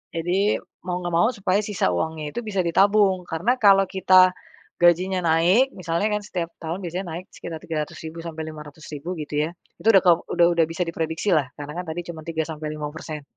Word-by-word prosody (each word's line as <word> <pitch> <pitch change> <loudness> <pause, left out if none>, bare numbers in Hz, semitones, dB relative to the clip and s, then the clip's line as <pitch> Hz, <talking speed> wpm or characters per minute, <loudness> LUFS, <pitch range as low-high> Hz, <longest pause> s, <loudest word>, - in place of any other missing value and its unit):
Jadi 180 +5 +1 0.3
mau 180 0 -1
ngga 175 - -3
mau 170 +5 +4
supaya 195 0 +1
sisa 205 - 0
uangnya 150 - -2
itu - - -1
bisa 195 -3 -1
ditabung. 195 +1 +3
Karena 175 +9 +1
kalau 195 -2 +6
kita 185 -1 +5 0.5
gajinya 180 +2 +4
naik 175 +11 +4
misalnya 170 +3 -1
kan - - -6
setiap 175 -5 -3
tahun 170 +3 -4
biasanya 180 +3 -4
naik 175 +3 -6
sekitar 160 -2 -7
300.000 160 +1 -5
sampai 165 -1 -6
500.000 155 +2 -8
gitu 150 +1 -1
ya - - -6 0.3
itu 220 - -5
udah 195 -4 +7
kau 175 -2 +6
udah 170 -1 +4
udah 170 -1 +3
bisa 165 +2 -2
diprediksilah 160 -2 0
karena 145 0 -7
kan 180 - -5
tadi 160 +2 -3
cuma 160 -2 -7
3 160 -1 -1
sampai 155 -1 -6
5%. 150 0 -6
170 Hz, 185 wpm, -23 LUFS, 160-185 Hz, 0.5 s, udah